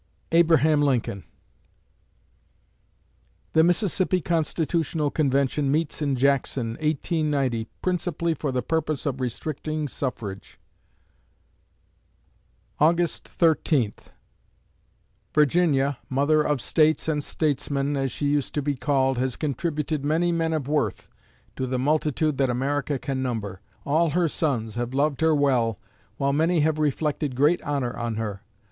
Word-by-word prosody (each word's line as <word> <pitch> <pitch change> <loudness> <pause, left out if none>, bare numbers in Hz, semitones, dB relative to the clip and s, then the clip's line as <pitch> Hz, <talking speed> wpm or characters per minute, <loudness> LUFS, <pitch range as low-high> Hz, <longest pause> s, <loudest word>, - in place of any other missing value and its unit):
ABRAHAM 160 -3 +4
LINCOLN 125 -8 0 2.3
The 160 - +5
Mississippi 185 +1 +1
Constitutional 160 -2 -1
Convention 140 -1 +1
meets 155 +1 -1
in 140 -2 +1
Jackson, 135 -2 +1
1890, 140 -3 -1 0.2
principally 170 -2 0
for 145 -2 -3
the 125 -1 -1
purpose 155 -1 -1
of 135 -2 -2
restricting 150 +4 -3
suffrage 110 -8 -5 2.2
August 170 +2 +2
Thirteenth 155 - +1 1.2
Virginia, 145 -3 +3
mother 145 +3 +3
of 150 -4 0
States 155 +3 +2
and 150 -2 0
statesmen, 145 -2 -1
as 135 -2 -1
she 145 - -3
used 145 -1 0
to 145 - 0
be 145 +1 0
called, 135 -1 +1
has 130 -1 -1
contributed 150 0 -2
many 165 +4 +1
men 165 -1 0
of 155 -4 -2
worth 150 0 -1 0.4
to 130 - -2
the 130 0 -1
multitude 150 +1 0
that 135 -2 +3
America 140 +3 -1
can 130 0 -3
number. 105 -7 -3 0.2
All 160 +3 +2
her 170 +3 +2
sons 125 -9 -1
have 120 +2 -3
loved 145 +1 +1
her 160 -1 +4
well, 125 -7 +2 0.4
while 140 0 +1
many 160 +3 +2
have 155 0 +1
reflected 150 -2 -1
great 150 +7 +3
honor 140 -4 -2
on 115 -1 -3
her. 105 -3 -4
145 Hz, 125 wpm, -25 LUFS, 130-155 Hz, 2.3 s, The